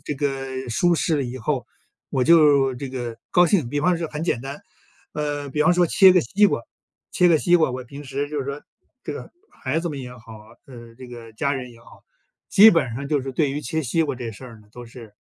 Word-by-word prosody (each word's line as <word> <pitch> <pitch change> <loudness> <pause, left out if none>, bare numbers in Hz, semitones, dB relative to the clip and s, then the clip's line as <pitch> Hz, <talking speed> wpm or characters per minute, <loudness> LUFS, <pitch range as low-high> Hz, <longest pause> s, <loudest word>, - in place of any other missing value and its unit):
这 145 0 -5
个 135 -2 -4
舒 175 +9 +2
适 160 -1 0
了 140 - 0
以 125 +1 -6
后， 130 +1 -2 0.4
我 130 - 0
就 145 -4 +5
这 135 +1 -7
个 120 -3 -5
高 175 0 +5
兴。 165 - +1
比 145 +1 -1
方 180 +2 +2
说 165 - -3
很 150 +1 -6
简 120 - -1
单， 140 +2 -7 0.5
呃， 145 -1 -3
比 150 +2 0
方 160 - +4
说 175 -1 +3
切 190 +3 +6
个 180 - +4
西 200 - +3
瓜 - - -1 0.5
切 180 - +4
个 160 - +4
西 175 +3 +2
瓜， 160 -5 +2
我 125 0 -6
平 140 +4 -10
时 140 +2 -4
就 150 - -4
是 135 - -3
说， 140 +1 -5 0.4
这 - - -4
个 - - -9 0.2
孩 135 +5 -3
子 175 - -3
们 140 - -6
也 125 -1 -8
好， 115 -1 -14 0.3
呃， 120 -3 -13
这 130 -1 -11
个 115 -2 -11
家 140 +5 -1
人 125 -2 -6
也 115 - -18
好， - - -18 0.5
基 215 +3 +8
本 165 - +1
上 140 +3 -5
就 145 -3 0
是 135 - -5
对 145 +1 0
于 145 - -3
切 155 +3 -3
西 160 +5 0
瓜 145 - -2
这 120 -2 -5
事 105 - -14 0.2
呢， 105 - -23
都 120 0 -10
是 115 -3 -13
140 Hz, 260 characters per minute, -22 LUFS, 125-155 Hz, 0.5 s, 基